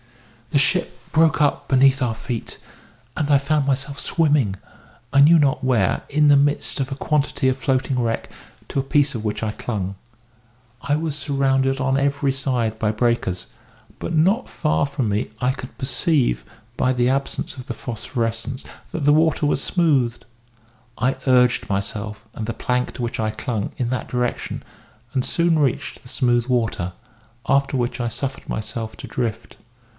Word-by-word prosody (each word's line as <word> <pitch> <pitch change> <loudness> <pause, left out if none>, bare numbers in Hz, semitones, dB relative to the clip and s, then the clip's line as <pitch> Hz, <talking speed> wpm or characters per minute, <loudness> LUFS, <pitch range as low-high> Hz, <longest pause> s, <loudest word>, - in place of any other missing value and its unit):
"The - - +2
ship 170 +5 +2
broke 160 -1 +4
up 145 - +1
beneath 135 0 +5
our 120 -3 0
feet, 115 +1 -5 0.6
and 150 -1 -1
I 145 - +6
found 140 +1 0
myself 140 +1 -1
swimming, 145 - +2 0.6
I 140 - +6
knew 160 +4 +8
not 140 -3 +2
where, 120 -8 +2
in 150 +1 +3
the 145 - +7
midst 145 +1 +2
of 135 0 -2
a - - -2
quantity 145 -1 0
of 130 - +3
floating 130 -1 0
wreck, 115 -2 -1 0.4
to - - -1
a - - 0
piece 145 0 +2
of 110 - -4
which 105 0 -2
I 110 - 0
clung. 100 -4 -4 0.9
I 145 +3 +1
was 155 -2 -2
surrounded 135 -2 +1
on 135 0 +1
every 140 0 +1
side 120 -5 -1
by 105 -1 +1
breakers; 110 -5 0 0.5
but - - -4
not 190 +10 +2
far 80 +1 +1
from 140 -4 -2
me 105 +1 -1
I 125 +1 +2
could 130 -1 -8
perceive, 130 - +1 0.3
by 130 - +2
the 125 -1 +2
absence 135 +1 -1
of 130 -2 -9
the 120 - -4
phosphorescence, 115 +1 -3 0.3
that 155 -4 -3
the 145 - +6
water 160 -1 +3
was 145 -2 +1
smooth. 140 -10 +2 0.8
I 125 +4 +1
urged 125 -1 +4
myself, 105 +2 -3
and 110 - -5
the 115 - -2
plank 125 +2 -1
to 125 - -5
which 120 0 -3
I 110 -1 +1
clung, 110 -1 -3
in 120 -2 -1
that 130 - -3
direction, 125 -1 -2 0.5
and 130 -2 +1
soon 170 +1 +2
reached 140 -5 -1
the 125 - -14
smooth 120 -2 +1
water; 115 -8 0 0.6
after 140 0 +2
which 120 +1 -1
I 120 - 0
suffered 135 +3 -5
myself 110 0 -4
to - - -8
drift. 115 -2 -3
130 Hz, 170 wpm, -22 LUFS, 115-140 Hz, 0.9 s, knew